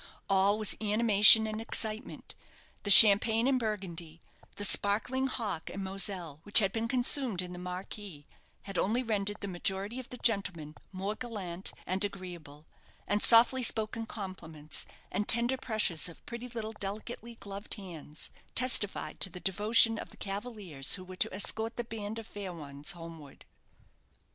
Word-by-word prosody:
All 195 Hz, +2 st, +2 dB
was 215 Hz, -2 st, 0 dB
animation 215 Hz, 0 st, +7 dB
and 215 Hz, 0 st, -5 dB
excitement. 220 Hz, +1 st, -4 dB, 0.5 s
The 205 Hz, -, -5 dB
champagne 220 Hz, +3 st, +9 dB
and 265 Hz, -1 st, +1 dB
burgundy, 180 Hz, -7 st, -6 dB, 0.4 s
the 205 Hz, -, 0 dB
sparkling 225 Hz, +7 st, +1 dB
hock 210 Hz, -10 st, -5 dB
and 195 Hz, -, -7 dB
moselle, 190 Hz, -5 st, -3 dB
which 205 Hz, +4 st, +4 dB
had 195 Hz, -4 st, +5 dB
been 225 Hz, +1 st, -3 dB
consumed 250 Hz, -3 st, +1 dB
in 180 Hz, -1 st, -3 dB
the 180 Hz, -, -9 dB
marquee, 180 Hz, -3 st, -8 dB, 0.4 s
had 195 Hz, -2 st, -5 dB
only 235 Hz, +6 st, -1 dB
rendered 205 Hz, -2 st, -3 dB
the 200 Hz, -, -5 dB
majority 195 Hz, +5 st, -4 dB
of 255 Hz, -, -11 dB
the 250 Hz, -, -9 dB
gentlemen 180 Hz, -10 st, -1 dB, 0.2 s
more 195 Hz, +2 st, -4 dB
gallant 200 Hz, -6 st, -5 dB
and 190 Hz, +2 st, -1 dB
agreeable; 175 Hz, -7 st, -8 dB, 0.4 s
and 205 Hz, 0 st, -1 dB
softly 240 Hz, +3 st, +5 dB
spoken 225 Hz, -1 st, -2 dB
compliments, 165 Hz, -8 st, -7 dB, 0.2 s
and 205 Hz, +3 st, -3 dB
tender 240 Hz, +3 st, +4 dB
pressures 215 Hz, -10 st, -1 dB
of 165 Hz, -, -16 dB
pretty 235 Hz, +1 st, -8 dB
little 225 Hz, -2 st, -6 dB
delicately 220 Hz, +3 st, -7 dB
gloved 200 Hz, 0 st, -5 dB
hands, 165 Hz, -7 st, -9 dB, 0.2 s
testified 235 Hz, -5 st, 0 dB
to 190 Hz, -, +2 dB
the 180 Hz, -, -10 dB
devotion 215 Hz, +4 st, +3 dB
of -, -, -9 dB
the -, -, -15 dB
cavaliers 195 Hz, -, -2 dB
who 185 Hz, -, -9 dB
were 185 Hz, 0 st, -11 dB
to -, -, 0 dB
escort 220 Hz, +4 st, -1 dB
the 240 Hz, -, -3 dB
band 220 Hz, -2 st, -7 dB
of 225 Hz, -, -8 dB
fair 200 Hz, -3 st, -8 dB
ones 150 Hz, +1 st, -5 dB
homeward. 165 Hz, -4 st, -13 dB
205 Hz, 155 wpm, -29 LUFS, 185-225 Hz, 0.5 s, champagne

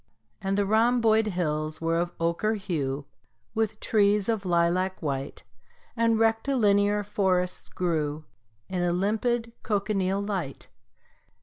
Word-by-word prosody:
And 195 Hz, 0 st, -1 dB
the 205 Hz, -, +2 dB
rhomboid 225 Hz, +1 st, +3 dB
hills 155 Hz, -5 st, -2 dB
were 165 Hz, 0 st, 0 dB
of 175 Hz, 0 st, -1 dB
ochre 170 Hz, +6 st, 0 dB
hue 145 Hz, -8 st, -3 dB, 0.5 s
With 220 Hz, -1 st, -1 dB
trees 205 Hz, -2 st, +2 dB
of 210 Hz, -4 st, -1 dB
lilac 175 Hz, +2 st, +1 dB
white, 140 Hz, -3 st, -4 dB, 0.5 s
And 230 Hz, -1 st, +2 dB
rectilinear 215 Hz, -3 st, +2 dB
forests 190 Hz, -3 st, 0 dB
grew 155 Hz, -4 st, -2 dB, 0.4 s
In 185 Hz, -1 st, -2 dB
a 175 Hz, -1 st, +1 dB
limpid 225 Hz, +5 st, 0 dB
cochineal 200 Hz, -2 st, 0 dB
light. 190 Hz, -9 st, -4 dB
195 Hz, 115 wpm, -27 LUFS, 170-215 Hz, 0.5 s, rhomboid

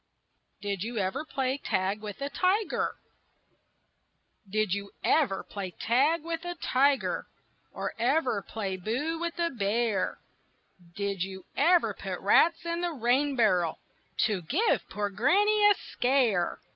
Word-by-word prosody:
DID 200 Hz, -2 st, -2 dB
YOU 230 Hz, +3 st, -4 dB
EVER 200 Hz, +9 st, -1 dB
PLAY 265 Hz, -2 st, -1 dB
TAG 190 Hz, 0 st, -1 dB
WITH 210 Hz, +5 st, -6 dB
A 280 Hz, -, -2 dB
TIGER? 390 Hz, +3 st, +1 dB, 1.5 s
Did 215 Hz, -1 st, +1 dB
you 200 Hz, 0 st, -3 dB
ever 270 Hz, -12 st, +2 dB
play 200 Hz, -2 st, -6 dB
tag 280 Hz, -, +1 dB
with 330 Hz, 0 st, -4 dB
a 350 Hz, 0 st, -4 dB
tiger, 275 Hz, -3 st, +1 dB, 0.4 s
Or -, -, -4 dB
ever 250 Hz, -3 st, +1 dB
play 195 Hz, -2 st, -4 dB
boo 260 Hz, -, -2 dB
with 340 Hz, 0 st, -3 dB
a 340 Hz, -1 st, 0 dB
bear; 220 Hz, -2 st, 0 dB, 0.8 s
Did 200 Hz, -2 st, -2 dB
you 190 Hz, 0 st, -4 dB
ever 340 Hz, +4 st, +4 dB
put -, -, -5 dB
rats 340 Hz, 0 st, +4 dB
in 340 Hz, 0 st, -2 dB
the 350 Hz, -, 0 dB
rain 270 Hz, +2 st, +1 dB
barrel 180 Hz, -9 st, +2 dB, 0.5 s
To 210 Hz, -5 st, -1 dB
give 325 Hz, -, 0 dB
poor 205 Hz, 0 st, -2 dB
old 200 Hz, -, -17 dB
Granny 415 Hz, -, +4 dB
a 410 Hz, -, +5 dB
scare? 245 Hz, -9 st, +1 dB
245 Hz, 140 wpm, -28 LUFS, 200-325 Hz, 1.5 s, a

